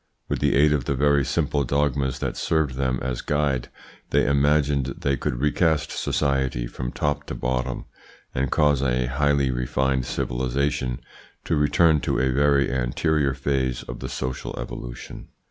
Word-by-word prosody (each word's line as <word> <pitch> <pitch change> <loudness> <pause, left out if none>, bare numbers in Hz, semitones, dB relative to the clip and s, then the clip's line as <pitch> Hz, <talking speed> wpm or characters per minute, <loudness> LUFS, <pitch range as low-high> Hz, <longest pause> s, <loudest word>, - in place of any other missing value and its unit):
With - - -1
the - - +2
aid 75 +2 +5
of 70 -5 -1
the 70 - 0
very 70 +1 +3
simple 70 +2 0
dogmas 70 0 0
that - - -3
served 80 -4 0
them 65 -1 0
as 65 -1 -2
guide, 75 -4 0 0.4
they - - +3
imagined 70 -1 +2
they 70 -1 0
could 60 - -2
recast 75 +1 +1
society 65 -4 0
from - - -5
top 75 0 -1
to - - -5
bottom, 65 0 -2 0.5
and 65 +1 0
cause 75 -2 +3
a 65 -2 +1
highly 70 +1 +1
refined 65 +1 0
civilisation 65 +1 -1 0.4
to 80 - +1
return 75 +2 +4
to - - -1
a 65 0 +2
very 70 +1 +3
anterior 70 +3 +1
phase 65 -2 -1
of - - -8
the - - -5
social 65 0 -4
evolution. - - -7
70 Hz, 155 wpm, -24 LUFS, 65-75 Hz, 0.5 s, aid